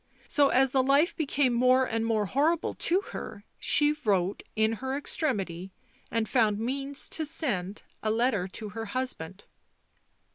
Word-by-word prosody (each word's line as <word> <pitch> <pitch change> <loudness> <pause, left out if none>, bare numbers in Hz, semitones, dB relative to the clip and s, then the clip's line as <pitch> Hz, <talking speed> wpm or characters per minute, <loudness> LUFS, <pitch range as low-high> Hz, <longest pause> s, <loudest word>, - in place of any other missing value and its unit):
So, 285 -2 +4
as 265 0 +3
the 265 - +3
life 280 +7 +3
became 280 -4 +1
more 255 +2 +4
and 225 -2 -1
more 220 -2 +1
horrible 305 - +1
to 360 +3 +1
her, 205 - -7 0.2
she 295 0 +3
wrote, 195 -2 +1
in 220 0 +2
her 265 +1 -2
extremity, 195 - -2 0.4
and 225 -1 -1
found 220 -4 +2
means 275 +5 -3
to 320 - -3
send, 210 - -3 0.2
a 215 - -1
letter 220 -4 +1
to 210 +3 -7
her 225 +2 -5
husband." 200 -7 -4
245 Hz, 150 wpm, -28 LUFS, 210-275 Hz, 0.4 s, So